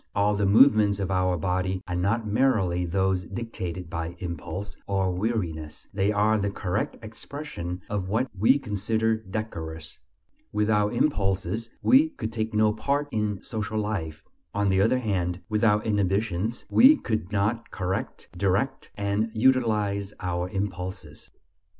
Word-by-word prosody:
All 100 +1 +3
the 100 -1 +1
movements 105 -2 +5
of 95 -1 -2
our 90 -1 +2
body 95 +2 -1
are 90 - -2
not 105 +6 0
merely 100 -6 +2
those 95 +1 +1
dictated 95 -7 -5
by 85 0 -4
impulse 90 +3 -5
or 95 -2 +1
weariness; 90 -6 -3
they 100 +1 +1
are 105 +1 +3
the 100 0 0
correct 100 +1 -2
expression 110 - -6
of 100 -3 -3
what 115 +6 +1
we 110 +8 +4
consider 110 -2 0
decorous. 85 -7 -6 0.5
Without 105 +1 +1
impulses 100 - 0
we 285 +5 +6
could 275 - -5
take 110 -1 -2
no 105 0 +3
part 140 +6 -1
in 105 -3 -1
social 110 -1 -3
life; 100 -8 -3 0.3
on 100 -1 +2
the 95 0 +3
other 115 +5 +3
hand, 95 -6 -1
without 105 -1 +2
inhibitions 105 +1 0
we 275 +5 +7
could 110 - -3
not 105 +3 0
correct, 95 0 -3
direct, 100 +9 0
and 100 +2 0
utilize 105 -5 +2
our 90 0 -2
impulses. 95 -5 -5
100 Hz, 140 wpm, -26 LUFS, 90-110 Hz, 0.5 s, we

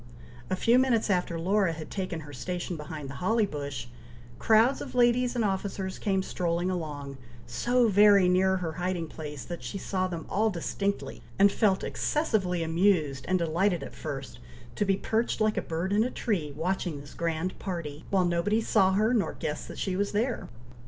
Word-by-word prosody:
A - - +1
few 235 +6 +4
minutes 235 -5 +2
after 180 -2 0
Laura 190 0 +2
had 155 -1 -8
taken 185 -4 -3
her 145 -1 -11
station 175 +6 -4
behind 150 -1 -7
the 135 - -7
holly 220 +4 +3
bush, 140 -8 -5 0.5
crowds 225 +4 +4
of - - -7
ladies 245 0 +3
and 235 -3 +1
officers 190 -1 -2
came 190 -2 0
strolling 175 0 -1
along, 145 -6 -5 0.3
so 240 - +2
very 205 -2 +6
near 190 +1 +3
her 175 -3 -3
hiding 180 0 -2
place, 150 -3 -7
that 175 -1 -6
she 200 - -5
saw 185 -1 -1
them 170 -3 -5
all 220 +2 +1
distinctly, 200 +2 -3 0.2
and 200 0 +6
felt 195 -3 +2
excessively 195 - 0
amused 165 -5 +2
and 185 - +3
delighted 175 +2 +1
at - - -8
first, - - -6 0.4
to 205 - +1
be 195 -1 +2
perched 225 +3 0
like 215 0 +2
a - - 0
bird 170 +4 -2
in 210 +2 +4
a 250 - -1
tree 185 - -2
watching 175 -2 -1
this 140 0 -12
grand 170 +2 -2
party, 165 -6 -5
while 190 -2 +3
nobody 175 +5 +1
saw 195 -4 +3
her, 215 +5 +3
nor 200 -9 +1
guessed 150 - -4
that - - -9
she 190 -2 -1
was 200 +2 -1
there. 235 +4 -1
185 Hz, 185 wpm, -28 LUFS, 165-205 Hz, 0.5 s, very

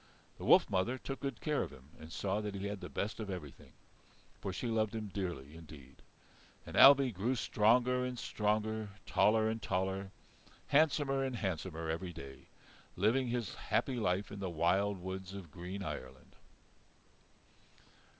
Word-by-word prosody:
The - - -6
wolf - - +7
mother 100 +7 0
took 135 +1 -6
good 135 -5 -4
care 150 -2 +1
of - - -3
him 65 +2 -15
and 80 +1 -10
saw 100 +3 -1
that 105 -1 -4
he 100 0 -4
had 100 -1 -4
the - - -6
best 105 +3 -3
of 105 -2 -4
everything, 85 -8 -8 0.7
for 95 - -3
she 95 - -4
loved 110 -2 0
him 110 -2 -4
dearly, 85 -7 -4
indeed. 75 -5 -13 0.7
And - - -8
Ailbe 135 -3 +8
grew 110 +8 0
stronger 125 +3 +3
and 125 -1 -3
stronger, 110 -1 -1 0.2
taller 110 +1 +3
and 110 0 -2
taller, 95 +1 -1 0.6
handsomer 140 -2 +3
and 130 -2 -2
handsomer 90 -5 -3
every 85 +2 -3
day, 70 -3 -10 0.5
living 115 +7 +2
his 120 -3 -2
happy 130 - -1
life 95 -2 0
in 100 - -7
the 95 -2 -2
wild 95 +5 +2
woods 95 +1 -6
of 90 -6 -9
green 90 +4 -6
Ireland. - - -7
100 Hz, 160 wpm, -34 LUFS, 90-115 Hz, 0.7 s, Ailbe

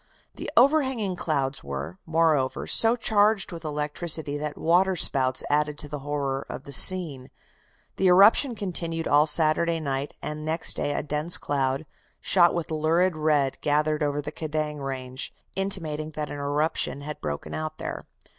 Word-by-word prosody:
The - - -6
overhanging 260 -8 +2
clouds 140 -5 -2
were, 70 +5 -6
moreover, 160 -5 +1
so 225 +1 +5
charged 215 -3 +2
with 170 -1 -8
electricity 150 0 -2
that 150 0 -4
water 185 +3 +2
spouts 130 -5 +1
added 150 0 0
to 150 - -4
the 145 0 -6
horror 140 -1 -3
of - - -7
the 140 - -6
scene. 150 -6 +5 0.7
The 190 - +2
eruption 205 +8 +5
continued 170 -5 -4
all 145 +2 +4
Saturday 165 +2 +3
night, 140 -2 -4
and 150 0 -6
next 160 +2 0
day 145 - -2
a - - -2
dense 150 +4 0
cloud, 135 0 -2 0.3
shot 175 - +3
with 170 -2 -4
lurid 160 +3 +1
red, 150 -3 0
gathered 150 +1 0
over 145 0 -1
the 150 - -6
Kedang 155 -1 -4
range, 130 -2 -5 0.2
intimating 165 -6 -1
that 150 -1 -4
an 145 - -6
eruption 145 0 -2
had 150 +1 -7
broken 75 -1 -5
out 155 0 -5
there. - - -6
155 Hz, 155 wpm, -25 LUFS, 145-170 Hz, 0.7 s, so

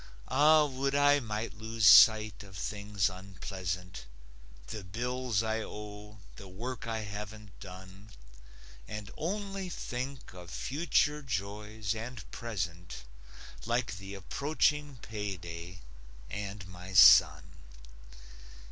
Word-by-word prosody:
Ah, 150 +2 +6
would 135 0 -1
I 145 0 +5
might 110 -2 -4
lose 110 -1 -1
sight 110 +1 +8
of 95 -2 -11
things 100 -2 -1
unpleasant: 90 -4 -6 0.6
The 105 - -7
bills 120 +3 -1
I 110 0 -1
owe; 105 0 -9 0.2
the 100 - -10
work 115 +6 -6
I 110 -1 -2
haven't 105 -1 -8
done. 95 +2 -11 0.8
And 105 -1 -7
only 195 +2 -3
think 130 - -5
of 90 -2 -11
future 150 - 0
joys 105 -3 -3
and 115 0 -7
present, 85 - -5 0.6
Like 120 -4 -1
the 95 +1 -8
approaching 145 - 0
payday, 90 -4 -6 0.5
and 100 -1 -5
my 90 +1 -10
son. - - +8
105 Hz, 105 wpm, -31 LUFS, 95-125 Hz, 0.8 s, sight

